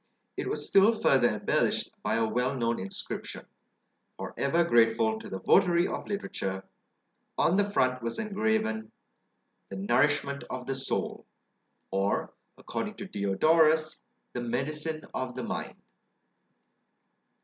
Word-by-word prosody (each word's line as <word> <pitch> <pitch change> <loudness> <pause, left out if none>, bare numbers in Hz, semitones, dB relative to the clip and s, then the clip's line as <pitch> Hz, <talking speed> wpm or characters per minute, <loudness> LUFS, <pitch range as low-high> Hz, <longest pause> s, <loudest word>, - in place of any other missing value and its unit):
It - - -3
was - - 0
still 200 +3 +6
further 130 - +4
embellished - - 0
by 105 +1 0
a 115 -1 +2
well 125 +4 0
known 115 -1 0
inscription, 95 +1 -6 0.7
for - - -6
ever 165 +5 +2
grateful 115 -5 +3
to - - -9
the 95 - -4
votary 175 -2 +4
of - - -5
literature; 95 - -3 0.7
on 170 - +3
the 205 - +4
front 130 -11 +1
was 115 0 -3
engraven, 210 - -1 0.8
"The 95 - -6
nourishment 140 +7 +1
of 125 -1 -5
the 135 - -2
soul;" 135 0 -3 0.6
or, 95 +1 0 0.2
according - - -4
to - - -7
Diodorus, 155 +11 +2 0.3
"The 120 - -3
medicine 150 +6 -2
of 125 -1 -3
the 130 - -4
mind." - - -4
130 Hz, 125 wpm, -29 LUFS, 115-160 Hz, 0.8 s, still